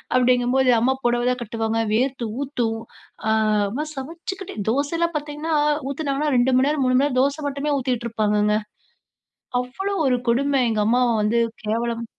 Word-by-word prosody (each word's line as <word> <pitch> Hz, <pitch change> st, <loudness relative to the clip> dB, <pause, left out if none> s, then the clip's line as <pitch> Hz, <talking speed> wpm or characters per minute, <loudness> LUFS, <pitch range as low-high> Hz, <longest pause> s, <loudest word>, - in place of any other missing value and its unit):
அப்படிங்கம்போது 250 Hz, +1 st, +3 dB
அம்மா 255 Hz, +4 st, +2 dB
புடவ 240 Hz, 0 st, +2 dB
தான் 250 Hz, -, -2 dB
கட்டுவாங்க. 225 Hz, 0 st, -2 dB
வேர்த்து 255 Hz, +2 st, 0 dB, 0.2 s
ஊத்தும். 240 Hz, -5 st, -2 dB, 0.5 s
ஆ 220 Hz, -, +3 dB, 0.4 s
அம்மா 280 Hz, +9 st, -3 dB
சமைச்சுக்கிட்டு 335 Hz, +7 st, -6 dB
தோசை 280 Hz, +6 st, 0 dB
எல்லாம் 340 Hz, -1 st, 0 dB
பார்த்தீங்கன்னா 300 Hz, +2 st, -3 dB, 0.3 s
ஊத்துனாங்கன்னா 285 Hz, 0 st, -1 dB
2:00 255 Hz, +2 st, +3 dB
மணி 265 Hz, +2 st, +3 dB
நேரம், 295 Hz, -2 st, 0 dB
3:00 255 Hz, 0 st, +2 dB
மணி 265 Hz, -, +4 dB
நேரம் 255 Hz, -3 st, 0 dB
தோச 285 Hz, +2 st, 0 dB
மட்டுமே 285 Hz, +1 st, -1 dB
ஊத்திட்டு 250 Hz, -2 st, -2 dB
இருப்பாங்கங்க. 210 Hz, -1 st, +1 dB, 1.1 s
அவ்ளோ 385 Hz, +12 st, -4 dB
ஒரு 250 Hz, -1 st, +2 dB
கொடும 275 Hz, +3 st, +2 dB
எங்க 215 Hz, -2 st, 0 dB
அம்மாவ 245 Hz, +2 st, +3 dB
வந்து 225 Hz, +3 st, +2 dB, 0.3 s
கேவலம் 230 Hz, +2 st, -1 dB
255 Hz, 155 wpm, -22 LUFS, 235-285 Hz, 1.1 s, மணி